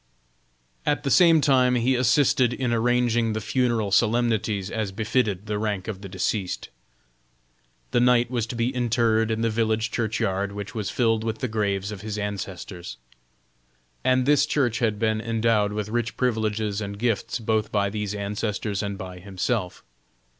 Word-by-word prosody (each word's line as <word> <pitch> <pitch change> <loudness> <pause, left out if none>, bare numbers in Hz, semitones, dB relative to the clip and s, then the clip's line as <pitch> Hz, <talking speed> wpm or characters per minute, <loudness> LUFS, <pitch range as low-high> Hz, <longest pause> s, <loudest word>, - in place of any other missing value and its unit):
At 145 - 0
the 135 - -1
same 165 -3 +6
time 130 -3 +4
he 125 +2 +2
assisted 125 0 +3
in 125 -2 -1
arranging 120 -1 +2
the 110 - -2
funeral 115 -2 0
solemnities 110 -3 +1
as 110 -3 -2
befitted 110 -1 0
the 105 -1 -2
rank 105 -3 -2
of 100 -4 -5
the 100 - -8
deceased. 95 +1 -2 1.2
The - - +3
knight 120 0 +3
was 120 -3 -1
to 115 - -5
be 120 +2 0
interred 115 -2 +1
in 110 0 -1
the 115 - +2
village 110 0 0
churchyard 100 -3 -1
which 100 +2 -6
was 110 -4 -3
filled 115 -3 +1
with 110 0 -2
the 130 - -2
graves 100 -3 -1
of 100 -3 -7
his 105 0 -5
ancestors. 95 -6 -5 1.1
And 130 0 +3
this 145 +1 +4
church 125 -5 +1
had 110 -4 +1
been 110 0 0
endowed 115 -2 +1
with 105 0 -3
rich 120 +1 -2
privileges 110 -4 0
and 100 -1 -5
gifts 115 0 -1
both 110 -2 -1
by 100 -1 +1
these 105 -1 -3
ancestors 105 0 -2
and 100 -1 -4
by 90 -1 -8
himself. 95 +1 -3
110 Hz, 160 wpm, -25 LUFS, 105-120 Hz, 1.2 s, same